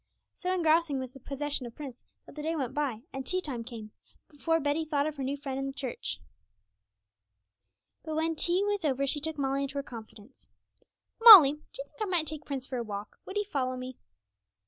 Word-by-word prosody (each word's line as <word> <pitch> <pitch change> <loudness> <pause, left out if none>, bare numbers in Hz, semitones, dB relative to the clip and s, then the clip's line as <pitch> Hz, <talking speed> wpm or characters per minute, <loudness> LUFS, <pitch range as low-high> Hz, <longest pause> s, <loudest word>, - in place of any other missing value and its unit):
So 365 - -3
engrossing 330 -4 +2
was 260 -1 -5
the 270 - -13
possession 275 -1 -3
of 230 - -12
Prince 270 -5 -9 0.2
that - - -14
the 300 - -7
day 320 +2 -1
went 265 -6 -3
by, 265 -7 -2
and 270 - -4
tea 370 +6 -1
time 265 -9 -4
came, 225 -3 -9 0.4
before 325 +2 0
Betty 295 +2 0
thought 295 -2 0
of 310 -1 -3
her 275 - -3
new 275 +2 -2
friend 270 -2 -4
in 270 - -2
the 270 - -5
church. 260 -3 -5 1.8
But 315 -1 -4
when 320 +1 0
tea 350 +4 +1
was 410 -2 -1
over 275 -2 +1
she 290 +2 0
took 320 0 -3
Molly 275 0 0
into 275 0 -4
her 280 - -2
confidence. 225 0 -12 0.7
'Molly, 400 -12 +12
do 300 - -9 0.2
you - - -4
think - - -19
I - - +2
might 355 -5 +1
take 310 0 -7
Prince 270 -3 -4
for 260 - -5
a 240 - -2
walk? 205 -1 -7
would 385 - -7
he 415 - +1
follow 260 -10 -2
me?' 255 0 -8
285 Hz, 215 wpm, -29 LUFS, 260-320 Hz, 1.8 s, Molly